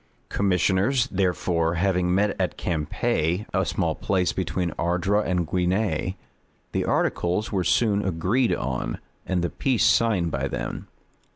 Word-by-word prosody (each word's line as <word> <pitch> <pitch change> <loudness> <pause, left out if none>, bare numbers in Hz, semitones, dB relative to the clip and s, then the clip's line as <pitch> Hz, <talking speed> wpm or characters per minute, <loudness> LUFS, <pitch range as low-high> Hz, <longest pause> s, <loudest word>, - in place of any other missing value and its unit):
Commissioners, 100 +6 +2
therefore, 90 -3 0
having 90 0 +1
met 100 +1 +2
at 90 - -1
Campe, 80 +3 -1
a 95 - +2
small 85 -1 0
place 90 +2 0
between 90 -2 -2
Ardres 90 +5 +1
and 90 -2 +1
Guisnes, 90 -1 0 0.6
the - - 0
articles 90 +5 0
were 95 -3 0
soon 105 0 +2
agreed 95 +8 +1
on, - - -2 0.3
and 90 -2 0
the 85 - -1
peace 125 -6 +1
signed 105 -6 +3
by 70 0 -1
them. - - -5
90 Hz, 130 wpm, -25 LUFS, 85-100 Hz, 0.6 s, signed